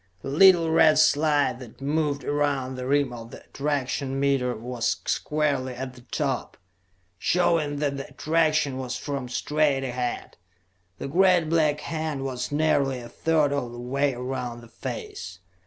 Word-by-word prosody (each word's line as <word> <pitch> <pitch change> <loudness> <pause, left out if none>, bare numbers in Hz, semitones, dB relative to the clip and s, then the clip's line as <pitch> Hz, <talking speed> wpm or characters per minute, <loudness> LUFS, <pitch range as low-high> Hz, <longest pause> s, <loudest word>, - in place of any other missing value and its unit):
The - - -4
little 165 +2 +6
red 160 -1 +5
slide 150 -3 +3
that 120 -4 -12
moved 145 0 -1
around 140 -2 0
the 130 0 -5
rim 140 -2 +2
of 115 -1 -8
the - - -11
attraction 140 -1 -2
meter 135 -3 +1
was 120 +1 -2
squarely 140 -4 0
at 130 0 -5
the 125 - -14
top, 135 +1 -3 0.6
showing 165 - +2
that 145 -1 -1
the 135 - -6
attraction 155 -4 +1
was 130 -1 -3
from 140 -4 -4
straight 145 +1 +1
ahead; 125 -1 -4 0.6
the - - -5
great 175 +1 +3
black 155 -2 +2
hand 155 -4 -3
was 125 -1 -3
nearly 145 -3 +2
a 120 -1 -9
third 155 +1 +1
of 125 -4 -2
the 120 - -8
way 135 +2 0
around 125 -1 -4
the 120 - -13
face. 90 -5 -7
140 Hz, 155 wpm, -25 LUFS, 125-150 Hz, 0.6 s, little